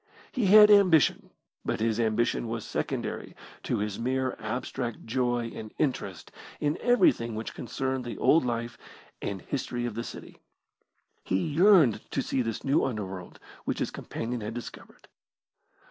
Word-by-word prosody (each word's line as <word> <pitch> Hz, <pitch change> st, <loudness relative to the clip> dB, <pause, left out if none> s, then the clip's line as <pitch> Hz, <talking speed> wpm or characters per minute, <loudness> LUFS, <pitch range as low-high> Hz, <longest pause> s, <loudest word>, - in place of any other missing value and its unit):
He 240 Hz, -6 st, 0 dB
had 210 Hz, +2 st, +9 dB
ambition, 185 Hz, -7 st, +5 dB, 0.3 s
but -, -, -2 dB
his 110 Hz, 0 st, 0 dB
ambition 115 Hz, +1 st, +1 dB
was 115 Hz, -1 st, -4 dB
secondary -, -, -4 dB, 0.3 s
to -, -, -1 dB
his 105 Hz, -1 st, -3 dB
mere 130 Hz, +2 st, -1 dB
abstract 120 Hz, +1 st, -4 dB
joy 120 Hz, -1 st, 0 dB
and 110 Hz, -1 st, -8 dB
interest 125 Hz, -, -2 dB, 0.3 s
in 150 Hz, +1 st, 0 dB
everything 185 Hz, -, +3 dB
which 110 Hz, +1 st, -5 dB
concerned 130 Hz, +2 st, -3 dB
the 120 Hz, -, -6 dB
old 165 Hz, -, +4 dB
life 120 Hz, -1 st, -3 dB, 0.4 s
and 95 Hz, -3 st, -4 dB
history 125 Hz, -3 st, -3 dB
of 120 Hz, -, -3 dB
the 115 Hz, +2 st, -4 dB
city. -, -, -10 dB, 0.8 s
He 95 Hz, -, 0 dB
yearned 155 Hz, -, +4 dB
to 135 Hz, -, -1 dB
see 130 Hz, -, 0 dB
this 115 Hz, -2 st, -3 dB
new 140 Hz, +2 st, +2 dB
underworld 95 Hz, -7 st, -5 dB, 0.3 s
which -, -, -1 dB
his -, -, -2 dB
companion 120 Hz, +1 st, -5 dB
had 105 Hz, +2 st, -5 dB
discovered. 120 Hz, -, -10 dB
120 Hz, 145 wpm, -28 LUFS, 110-135 Hz, 0.8 s, had